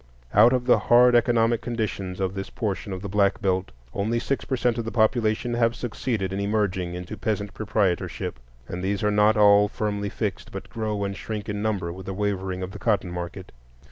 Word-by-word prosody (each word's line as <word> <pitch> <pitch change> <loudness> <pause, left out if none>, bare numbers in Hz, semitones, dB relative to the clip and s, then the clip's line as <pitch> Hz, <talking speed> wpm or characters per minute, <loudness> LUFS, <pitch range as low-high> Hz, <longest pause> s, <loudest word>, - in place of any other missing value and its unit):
Out 110 +4 +7
of 125 -1 0
the 125 - +5
hard 125 +1 +5
economic 120 -1 +3
conditions 100 -6 -3
of 95 -1 -1
this 95 0 -5
portion 105 -3 -3
of 95 +1 -5
the - - -3
Black 100 0 +2
Belt, 95 -1 0 0.2
only 110 +4 0
six 135 +3 -1
per 135 - -1
cent 120 -1 0
of 115 - -3
the 115 - -3
population 110 0 +1
have 115 -1 +2
succeeded 110 -5 -3
in 95 - -2
emerging 100 -4 -1
into 90 +3 -6
peasant 105 0 -2
proprietorship; 100 - -1 0.3
and 90 +1 -5
these 100 +2 -1
are 105 - +3
not 105 +2 +4
all 105 0 +6
firmly 100 -1 -2
fixed, 100 -2 -4
but - - -8
grow 105 -2 -2
and 100 0 -3
shrink 110 -1 -5
in 105 -1 -3
number 100 -6 -1
with 95 +1 -10
the 95 - -4
wavering 95 -2 -2
of 95 - -5
the 100 - -9
cotton 100 -6 0
market. 85 -1 -6
105 Hz, 205 wpm, -25 LUFS, 95-115 Hz, 0.3 s, Out